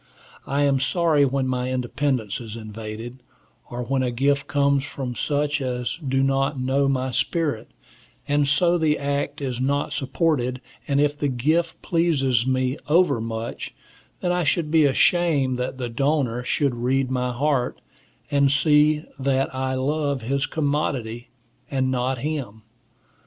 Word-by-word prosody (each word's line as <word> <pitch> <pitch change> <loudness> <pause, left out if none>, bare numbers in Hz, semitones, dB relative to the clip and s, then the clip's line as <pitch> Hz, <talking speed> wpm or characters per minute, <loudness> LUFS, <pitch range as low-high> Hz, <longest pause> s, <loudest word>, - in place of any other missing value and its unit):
I 140 +2 +1
am 140 -1 +3
sorry 155 +1 +2
when 135 0 0
my 125 0 -1
independence 125 -3 -1
is 110 -2 -8
invaded, 110 +2 -7 0.5
or 120 0 -4
when 130 +2 0
a 125 - +1
gift 140 +3 +1
comes 140 -1 +2
from 135 -3 -5
such 145 +2 -1
as 125 +2 -2
do 135 -1 +1
not 135 +1 +1
know 135 +2 +1
my 130 -1 0
spirit, 150 -4 -1 0.6
and 145 0 +2
so 170 +5 +3
the 155 -2 +2
act 140 +1 -2
is 130 -3 -3
not 140 +2 0
supported; 135 -2 0 0.3
and 140 -1 +1
if 145 0 +2
the 145 0 -1
gift 155 +7 0
pleases 135 -8 +1
me 130 +1 0
overmuch, 115 -9 0 0.5
then 175 - 0
I 180 0 +1
should 150 0 0
be 160 -2 +5
ashamed 140 -3 +3
that 125 +1 -3
the 125 -2 -3
donor 125 -1 0
should 140 +1 +1
read 130 +2 0
my 125 -1 0
heart, 130 0 0 0.5
and 140 -1 +3
see 150 +1 +3
that 135 0 0
I 130 0 -1
love 140 -1 -1
his 135 +4 0
commodity, 135 -6 -2 0.4
and 130 -1 0
not 130 +1 0
him. 130 -6 -4
135 Hz, 145 wpm, -23 LUFS, 125-145 Hz, 0.6 s, be